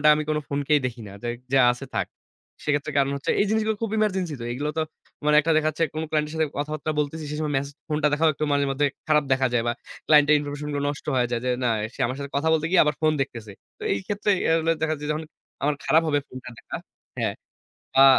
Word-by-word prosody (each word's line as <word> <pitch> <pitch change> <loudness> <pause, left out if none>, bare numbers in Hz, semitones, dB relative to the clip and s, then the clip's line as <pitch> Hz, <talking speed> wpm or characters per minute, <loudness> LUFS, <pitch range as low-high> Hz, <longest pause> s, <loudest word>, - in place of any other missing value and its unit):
আমি 155 - -1
কোন 155 - +2
ফোনকেই 145 +1 +2
দেখি 120 -2 -4
না, - - -10
যাই 120 0 -1 0.2
যা 135 - +6
আছে 125 +3 -8
থাক। - - 0 0.6
সেক্ষেত্রে 145 0 0
কারণ 140 0 +3
হচ্ছে 140 - -1
এই - - +3
জিনিসগুলো 220 0 +1
খুব 225 -2 -1
ইমার্জেন্সি 190 -6 0
তো। - - -4
এগুলো 145 +5 -2
তো - - +3 0.4
মানে 150 0 +5
একটা 165 +2 +1
দেখা 155 0 +2
যাচ্ছে 160 +2 -1
কোন 155 +1 -2
ক্লায়েন্টের 150 -1 0
সাথে 160 -1 +1
কথাবার্তা 150 +1 -2
বলতেছি, 150 +2 -2
সে - - -3
সময় 150 -2 -1
মেসেজ 140 +1 -3
ফোনটা 150 -1 +2
দেখাও 160 +2 +4
একটু 155 - -2
মাঝে-মধ্যে 140 0 +2 0.2
খারাপ 150 -1 +4
দেখা 130 0 +2
যায় 120 -1 +2
বা 120 - +2 0.3
ক্লায়েন্টের 150 0 +6
ইনফরমেশন 145 0 -5
গুলো 145 0 -1
নষ্ট 145 - -6
হয়ে 125 -1 +2
যায়। 120 - 0
যে - - +1
"না, 120 - +3 0.2
সে - - -16
আমার 125 +2 -2
সাথে 140 0 -5
কথা 145 +3 +1
বলতে 160 -1 +1
গিয়ে 185 0 +6
আবার 150 0 +1
ফোন 155 -1 +4
দেখতেছে।" 115 -5 -5 0.3
তো - - -23
এই 100 - -1
ক্ষেত্রে 205 +1 -1 0.2
এগুলা 165 0 +3
দেখা 160 0 +1
যাচ্ছে 150 -1 -5
যে - - +2
অনেক 155 -1 -9 0.3
আমার 145 +1 +2
খারাপ 160 +1 +4
হবে 145 -2 +2
ফোনটা 130 0 -9
দেখা - - -7 0.4
হ্যাঁ, - - 0 0.7
আ - - +10
150 Hz, 235 wpm, -25 LUFS, 140-155 Hz, 0.7 s, আ